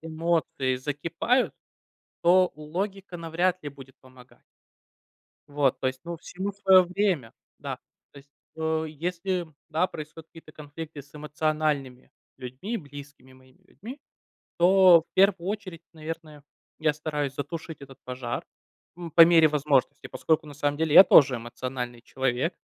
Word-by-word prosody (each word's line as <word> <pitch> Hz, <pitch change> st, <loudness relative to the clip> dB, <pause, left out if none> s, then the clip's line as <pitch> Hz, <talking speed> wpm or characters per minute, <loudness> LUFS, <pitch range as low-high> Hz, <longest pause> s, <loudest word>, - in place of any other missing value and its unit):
эмоции 160 Hz, -5 st, -1 dB
закипают, 155 Hz, -, -1 dB, 0.7 s
то 180 Hz, +1 st, +5 dB
логика 185 Hz, +5 st, -5 dB
навряд 175 Hz, +2 st, -1 dB
ли 145 Hz, -, -5 dB
будет 135 Hz, -2 st, -14 dB
помога 130 Hz, -1 st, -19 dB, 1.1 s
Вот, 145 Hz, -3 st, 0 dB
то -, -, -4 dB
есть, 130 Hz, 0 st, -4 dB
ну, 170 Hz, 0 st, -6 dB
всему 190 Hz, +4 st, -5 dB
своё 190 Hz, -2 st, +5 dB
время, 180 Hz, -, -1 dB, 0.3 s
да, -, -, -5 dB, 0.3 s
то -, -, -15 dB
есть. 140 Hz, 0 st, -16 dB, 0.3 s
Э, 160 Hz, 0 st, -1 dB
если, 175 Hz, +3 st, -3 dB, 0.2 s
да, 160 Hz, +3 st, +1 dB
происходят 160 Hz, -2 st, -10 dB
какие-то 165 Hz, -1 st, -15 dB
конфликты 150 Hz, 0 st, -9 dB
с 140 Hz, -, -26 dB
эмоциональными 150 Hz, -3 st, -2 dB, 0.3 s
людьми, 130 Hz, -, -6 dB
близкими 145 Hz, -, -12 dB
моими 130 Hz, +6 st, -22 dB
людьми, 245 Hz, +10 st, -11 dB, 0.6 s
то, 185 Hz, 0 st, +7 dB
в -, -, -42 dB
первую 190 Hz, -2 st, +3 dB
очередь, 195 Hz, -5 st, -5 dB
наверное, 155 Hz, -2 st, -8 dB, 0.4 s
я 155 Hz, -1 st, +2 dB
стараюсь 150 Hz, -2 st, -3 dB
затушить 160 Hz, +2 st, -6 dB
этот 135 Hz, -2 st, -12 dB
пожар, 125 Hz, -2 st, -5 dB, 0.5 s
м, 170 Hz, -2 st, -8 dB
по 165 Hz, -, +7 dB
мере 165 Hz, -2 st, +6 dB
возможности, 145 Hz, -2 st, 0 dB
поскольку 160 Hz, 0 st, 0 dB
на 145 Hz, -, -10 dB
самом 145 Hz, +1 st, -1 dB
деле 160 Hz, -1 st, 0 dB
я 190 Hz, -, +11 dB
тоже 140 Hz, -3 st, +6 dB
эмоциональный 120 Hz, +1 st, -6 dB
человек, 130 Hz, +6 st, -2 dB
155 Hz, 140 wpm, -26 LUFS, 140-175 Hz, 1.1 s, я